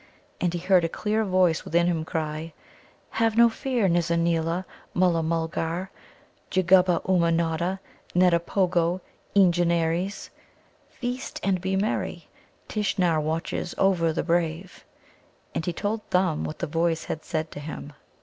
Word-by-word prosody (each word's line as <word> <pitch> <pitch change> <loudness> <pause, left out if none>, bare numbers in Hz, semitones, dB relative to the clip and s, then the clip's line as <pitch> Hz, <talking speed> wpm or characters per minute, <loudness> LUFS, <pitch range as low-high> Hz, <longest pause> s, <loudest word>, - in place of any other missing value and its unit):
And 180 - +1
he - - -2
heard 180 0 +4
a 165 - 0
clear 215 +5 0
voice 185 -4 +2
within 170 +2 +2
him 165 -3 0
cry: 155 0 -4 0.6
"Have 225 0 +1
no 235 0 +7
fear, 240 -2 0
Nizza 170 -1 +1
neela, 170 +1 0 0.3
Mulla 175 -2 +3
mulgar 165 +2 -2 0.6
jugguba 185 -2 +4
Ummanodda, 170 0 +1 0.4
neddipogo, 180 0 +2 0.3
Eengenares; 175 0 +2 0.6
feast 250 0 -5
and 190 -2 +1
be 190 +1 -1
merry. 205 +4 -2 0.4
Tishnar 185 -6 +1
watches 160 +3 -3
over 180 -4 +3
the - - -2
brave." 170 +1 -1 0.7
And 160 - -3
he - - +2
told 205 +5 -2
Thumb 180 -4 +1
what 155 - -5
the - - -2
voice 165 +1 0
had 155 - -5
said 160 0 -3
to - - -7
him. 145 0 -7
175 Hz, 130 wpm, -26 LUFS, 165-190 Hz, 0.7 s, no